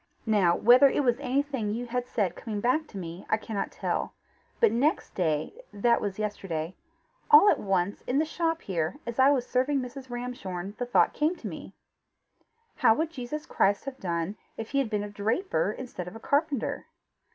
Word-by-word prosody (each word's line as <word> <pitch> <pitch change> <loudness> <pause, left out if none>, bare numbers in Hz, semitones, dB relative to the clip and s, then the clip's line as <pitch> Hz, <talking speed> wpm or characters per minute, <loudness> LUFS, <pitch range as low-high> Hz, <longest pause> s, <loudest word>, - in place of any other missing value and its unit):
"Now 200 -6 +3
whether 250 +4 +7
it 290 - 0
was 245 -1 +2
anything 270 -5 -1
you 245 +1 -3
had 245 +1 -3
said 205 -7 -1
coming 215 -3 -5
back 255 +8 +1
to 205 - -10
me, 170 0 -7
I 215 - +3
cannot 215 -2 -4
tell, - - -2 0.4
but 460 - +5
next 285 +7 +1
day, 155 -5 0 0.2
that 235 +4 +2
was 200 -2 -3
yesterday, 190 -6 -3 0.5
all 445 -2 +9
at - - 0
once, 195 -1 0
in 255 - +1
the 310 - +3
shop 330 +1 -1
here, 170 - -2
as 235 +1 -5
I 265 +1 +7
was 265 -4 +2
serving 260 +3 +1
Mrs. 255 +1 -7
Ramshorn, 205 -7 -5
the 245 - -2
thought 245 - +3
came 310 +4 +1
to - - -7
me: - - -8 1.0
How 225 - +5
would 320 +3 -1
Jesus 300 +1 -5
Christ 200 +5 +1
have 275 -1 -6
done 170 +2 -2 0.2
if 225 - -6
he 275 - +2
had 265 -5 0
been 210 -2 -1
a - - -4
draper 210 - 0
instead 215 -7 -7
of 180 - -8
a - - -8
carpenter? 285 0 -1
240 Hz, 190 wpm, -28 LUFS, 200-275 Hz, 1.0 s, all